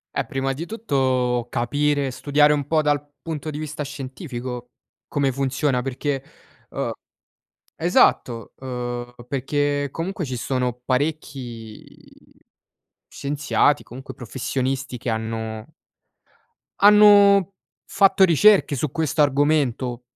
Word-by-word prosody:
Eh, - - 0
prima 135 0 -2
di 160 +6 -6
tutto 130 - 0
capire, 140 +2 0
studiare 145 +3 +3
un 145 -2 -2
po' 155 0 +2
dal 145 -1 +1 0.2
punto 155 -2 -5
di 150 - -5
vista 155 0 -5
scientifico 130 -3 -6 0.4
come 140 -2 0
funziona 135 0 0
perché, 135 +1 -3 0.5
uhm, - - -3 0.8
esatto, 115 -3 +2
ehm, 120 -1 -5
perché 145 +2 -1
comunque 175 +4 -4
ci 130 -2 -4
sono 125 0 -1
parecchi 130 -5 -5 0.7
scienziati 145 0 0
comunque 130 +3 -10
professionisti 130 +2 -3
che 120 - -3
hanno 110 -1 -4 1.1
hanno 205 -2 +7 0.3
fatto 195 -1 +3
ricerche 185 -2 +5
su 145 +2 -2
questo 160 -2 -1
argomento 140 -4 +1
140 Hz, 105 wpm, -22 LUFS, 125-150 Hz, 1.1 s, hanno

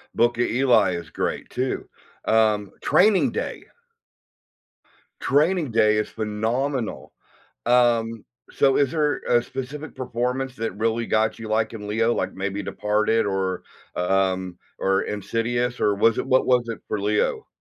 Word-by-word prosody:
Book 120 0 +2
of 120 - +2
Eli 125 -6 +3
is 85 -2 -7
great, - - -3
too. 130 +1 -3 0.4
Um, 110 -3 +2
Training 210 -3 +4
Day! - - -5 1.5
Training 150 +1 +2
Day 110 -1 +3
is 105 - -1
phenomenal. 115 +4 -2 0.6
Um, 115 -2 +2 0.3
so 135 -1 +3
is 140 -2 +2
there 150 -2 +1
a 120 -1 +4
specific 135 +4 -7
performance 125 +1 -3
that 115 0 -3
really 115 +1 0
got 110 +1 +1
you, 110 -1 -7
like, 110 0 0
in 105 -2 -7
Leo, 115 +3 +1
like, - - -2
maybe 100 +1 -3
Departed, 105 +2 0
or, 95 -2 -1 0.3
um 95 0 0 0.2
or 95 0 +1
Insidious, 115 +4 -2
or 105 -1 +3
was 115 +2 +3
it - - -2
what 130 0 +3
was 125 -2 +2
it 115 - -4
for 105 - -2
Leo? 105 +1 0
115 Hz, 145 wpm, -23 LUFS, 105-125 Hz, 1.5 s, Training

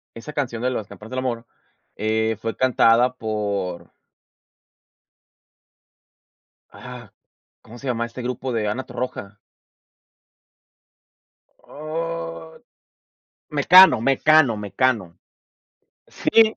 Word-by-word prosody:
esa 120 +6 -9
canción 120 -5 -3
de 130 - +1
las 110 -5 -4
campanas 105 +4 -13
del 130 - -2
amor, 120 -2 -3 0.5
eh, 110 0 -1
fue 115 0 -3
cantada 125 -1 +3
por 100 -6 -4 2.8
Ah, - - -11 0.5
¿cómo 120 +1 -13
se 140 - -10
llama 115 -1 -1
este 120 +2 -9
grupo 125 +1 -4
de 110 -2 -1
Ana 125 +6 -3
Torroja? 105 -5 -6 2.3
Oh, 145 - -6 0.9
Mecano, 170 0 +7
Mecano, 135 -1 +4
Mecano. 100 -3 -1 0.9
Sí. 220 -1 +3
115 Hz, 90 wpm, -22 LUFS, 105-130 Hz, 2.8 s, Mecano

